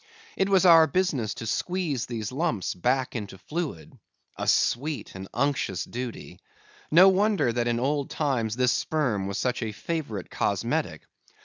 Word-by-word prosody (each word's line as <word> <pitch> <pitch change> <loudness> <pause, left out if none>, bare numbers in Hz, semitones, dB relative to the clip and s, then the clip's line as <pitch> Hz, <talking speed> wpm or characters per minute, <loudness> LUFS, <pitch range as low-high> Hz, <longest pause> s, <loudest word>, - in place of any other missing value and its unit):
It 195 - +1
was 190 -2 +4
our 165 -2 +8
business 150 - 0
to - - -7
squeeze 150 -2 -2
these 110 -3 -4
lumps 135 - -1
back 125 +8 0
into 100 -4 -5
fluid. 155 - -5 0.4
A - - -4
sweet 145 +4 +1
and 95 +1 -8
unctuous 140 -10 -1
duty! 125 -1 -7 0.5
No 175 +5 +7
wonder 195 - +2
that 120 0 0
in 120 0 0
old 140 +2 -1
times 125 -8 -1
this 125 0 +2
sperm 125 -13 0
was 100 - -3
such 125 0 -1
a 110 -2 -2
favourite 110 - -4
cosmetic. - - -1
130 Hz, 150 wpm, -26 LUFS, 115-160 Hz, 0.5 s, our